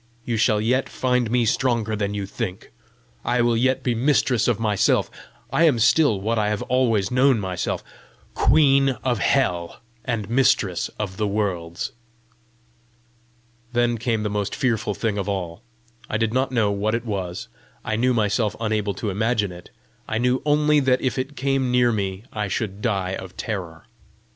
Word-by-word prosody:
You 120 - -1
shall 110 -1 +2
yet 125 +5 +1
find 125 -2 0
me 120 0 +2
stronger 115 -2 +1
than 105 -1 -2
you 100 -1 -3
think! 95 -1 -6 0.5
I 120 0 +1
will 120 -1 +2
yet 130 +3 +1
be 125 - +1
mistress 125 -1 +2
of 120 -3 +1
myself! 105 -3 +1 0.4
I 170 - +4
am 145 -7 +4
still 115 -1 +4
what 110 +3 0
I 105 -1 +1
have 105 -1 -2
always 115 -6 +1
known 130 -1 +4
myself 95 -3 -3 0.5
queen 135 -3 +4
of 125 -4 0
Hell, 90 -12 0 0.2
and 110 -5 -2
mistress 110 -7 +2
of 95 -3 -4
the 105 - 0
worlds!" 100 +1 -2 1.8
Then 120 -1 +1
came 115 -2 -1
the 105 - -1
most 105 -1 -2
fearful 120 -5 0
thing 105 -3 -1
of 100 +1 -3
all. 90 -1 -4 0.5
I 105 - 0
did 110 0 0
not 130 +1 +1
know 110 -5 +2
what 105 +2 0
it 115 +1 -4
was; 95 -5 -4 0.4
I 110 - -1
knew 125 +3 +2
myself 105 -1 +1
unable 105 -3 -1
to 105 0 -3
imagine 105 0 0
it; 90 0 -12 0.4
I 110 - -1
knew 125 +2 +1
only 150 0 +4
that 130 -2 +2
if 130 0 -1
it 135 +3 -4
came 135 -1 0
near 125 -1 +3
me 100 -2 -3
I 105 -1 -2
should 100 0 -3
die 95 -5 -1
of 95 -1 -7
terror! 90 -7 -5
110 Hz, 170 wpm, -23 LUFS, 100-125 Hz, 1.8 s, I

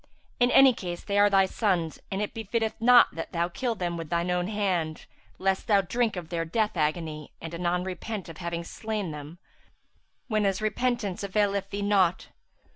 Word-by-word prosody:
In 245 0 +4
any 270 0 +7
case, 175 -5 -6
they 200 0 0
are 205 0 +6
thy 195 -1 +5
sons, 185 -6 -1
and 195 +2 -1
it 210 - -5
befitteth 225 0 -1
not 245 +1 +7
that 165 - -6
thou 170 0 0
kill 235 +6 -2
them 175 -3 -3
with 165 -2 -6
shine 170 +1 0
own 180 0 0
hand, 185 -7 -1 0.3
lest 190 0 0
thou 205 -3 +5
drink 230 +3 0
of 175 -3 -6
their 170 -1 -1
death 215 +5 -1
agony,[FN#362] 155 -1 -2
and 165 0 -7
anon 175 +1 0
repent 190 +2 -5
of 165 -2 -10
having 170 -1 -3
slain 210 0 -4
them 150 +3 -8 0.9
whenas 210 -4 +1
repentance 215 -2 -1
availeth 200 0 0
thee 200 +1 -3
naught. 190 -3 +2
190 Hz, 180 wpm, -27 LUFS, 170-215 Hz, 0.9 s, any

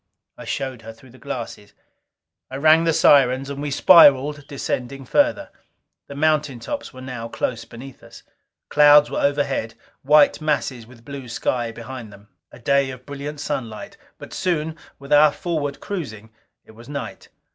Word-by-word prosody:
I - - -11
showed 130 -4 -4
her 115 0 -10
through 120 +3 -19
the 130 - -18
glasses. 115 -6 -7 0.8
I 130 - -7
rang 155 +4 +4
the 165 - +3
sirens, 135 -3 +4
and 140 0 -6
we 145 - -3
spiraled, 145 -2 +5
descending 135 -1 -4
further. 295 - +1 0.6
The 140 - -9
mountain 150 -3 0
tops 285 - -6
were 130 -1 -11
now 125 -3 -6
close 115 0 -4
beneath 130 +3 -12
us. - - -15 0.5
Clouds 150 0 +6
were - - -2
overhead, 140 -5 -1 0.3
white 150 +2 +4
masses 135 -6 -2
with 115 -2 -18
blue 140 -3 -8
sky 120 0 -2
behind 115 -1 -9
them. 100 +1 -17 0.2
A - - -13
day 140 +2 +1
of 130 -1 -10
brilliant 145 +1 -7
sunlight. 120 -8 -5 0.2
But - - -11
soon, 160 -3 -2 0.2
with 140 +1 -4
our 150 0 +6
forward 145 -4 -4
cruising, 110 - -7 0.3
it - - -16
was 115 +4 -15
night. 140 -1 -7
140 Hz, 160 wpm, -21 LUFS, 120-150 Hz, 0.8 s, Clouds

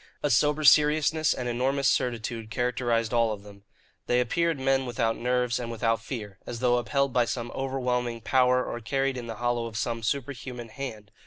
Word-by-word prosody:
A 145 - +1
sober 150 +5 +3
seriousness 150 +1 +5
and 125 - -2
enormous 135 +3 +1
certitude 115 -2 -1
characterized 120 -1 0
all 115 -2 +3
of 100 -2 -6
them. 100 -1 -15 0.4
They 125 - +3
appeared 165 +5 0
men 135 0 +1
without 115 -1 0
nerves 125 0 0
and 120 -1 -4
without 115 -1 0
fear, 105 -5 -7
as 120 - -5
though 125 0 +3
upheld 140 +2 0
by 120 -1 +3
some 120 0 -4
overwhelming 125 -3 -2
power 125 +1 +3
or 120 - -4
carried 135 +3 -1
in 120 -2 -6
the 115 - -5
hollow 120 +1 -1
of 110 -1 -7
some 115 -1 -2
superhuman 125 -1 -4
hand. 110 -6 -7
125 Hz, 180 wpm, -27 LUFS, 115-135 Hz, 0.4 s, seriousness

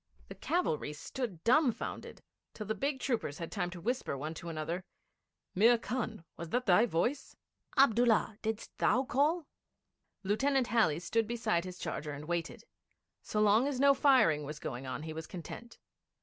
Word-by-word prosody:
The - - -6
cavalry 160 - -1
stood 185 - -5
dumbfoundered, 255 -1 +1 0.3
till 215 - -6
the 220 - -1
big 275 +3 -2
troopers 225 - -2
had 165 - -6
time 180 -4 -2
to 175 0 -8
whisper 235 - -2
one 155 +4 -4
to 170 +1 -7
another: 165 +3 -3 0.7
'Mir 230 +5 +5
Khan, 225 -6 -4
was 170 -1 -6
that 250 +6 0
thy 205 +5 +5
voice? 240 - -1 0.4
Abdullah, 230 -4 +4
didst 220 0 -4
thou 255 - +3
call?' 295 +6 +1 0.8
Lieutenant 265 +7 +2
Halley 215 -10 +2
stood 225 +5 0
beside 225 -7 0
his 180 -1 -7
charger 150 -4 -4
and 145 +1 -7
waited. 170 0 -3 0.6
So 210 - -1
long 215 +5 +4
as 275 -3 -2
no 280 0 +6
firing 255 - +4
was 150 +1 -6
going 130 -2 -6
on 140 - -4
he 160 0 -5
was 160 0 -6
content. 190 +7 -9
215 Hz, 165 wpm, -32 LUFS, 165-250 Hz, 0.8 s, no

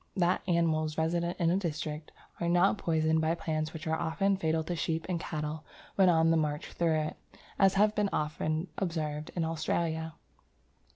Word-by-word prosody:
That 180 -1 +2
animals 160 -3 +1
resident 170 +2 0
in 170 -1 +3
a 180 - +2
district 155 -4 -4 0.3
are 170 - 0
not 180 +4 +3
poisoned 160 -1 +2
by 160 +1 +1
plants 155 -2 -2
which 160 -2 -8
are 160 0 +1
often 195 +4 +1
fatal 160 -3 0
to 175 +2 -3
sheep 160 0 -1
and 180 -2 -1
cattle 155 -1 -4 0.3
when 190 -2 +5
on 165 -1 +4
the 165 - +4
march 150 -1 -2
through 165 -2 +1
it, 155 - -4 0.4
has 195 -1 +5 0.2
been 210 -1 +1
often 155 +2 -1
observed 155 -5 -2
in 170 -2 0
Australia. 160 0 -1
160 Hz, 170 wpm, -30 LUFS, 155-175 Hz, 0.4 s, when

